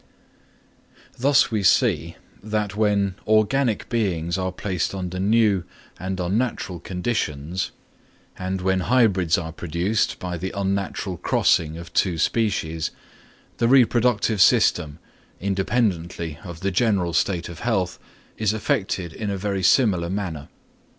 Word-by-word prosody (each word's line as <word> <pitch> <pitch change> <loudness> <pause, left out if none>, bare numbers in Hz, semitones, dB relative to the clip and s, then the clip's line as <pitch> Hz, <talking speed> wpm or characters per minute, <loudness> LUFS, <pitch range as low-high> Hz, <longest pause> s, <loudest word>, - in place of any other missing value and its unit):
Thus 135 -1 +4
we 110 -2 0
see 95 - +2 0.3
that 105 -1 -2
when 100 -2 +1
organic 110 +2 +2
beings 90 -8 -1
are 95 -1 -1
placed 90 0 -2
under 95 -1 -4
new 105 -2 +3 0.4
and 95 0 -4
unnatural 95 -1 -1
conditions, 90 -3 -2 0.7
and 95 0 -3
when 95 0 +1
hybrids 95 -6 +3
are 80 -2 -4
produced 90 +6 -1
by 90 -1 -4
the 95 +2 -4
unnatural 100 -1 -2
crossing 80 0 +1
of 85 0 -10
two 90 -4 +1
species, 80 -6 0 0.7
the 115 - +3
reproductive 120 -4 +3
system, 90 - +4 0.4
independently 95 -5 -1
of 85 -3 -9
the 100 - 0
general 95 -4 +1
state 85 -2 0
of 85 -2 -9
health, 95 -7 -1 0.4
is 110 -1 +1
affected 95 -5 -1
in 105 -2 -4
a 100 - -2
very 100 0 -2
similar 95 -4 +3
manner. 85 -7 -4
95 Hz, 125 wpm, -23 LUFS, 85-110 Hz, 0.7 s, Thus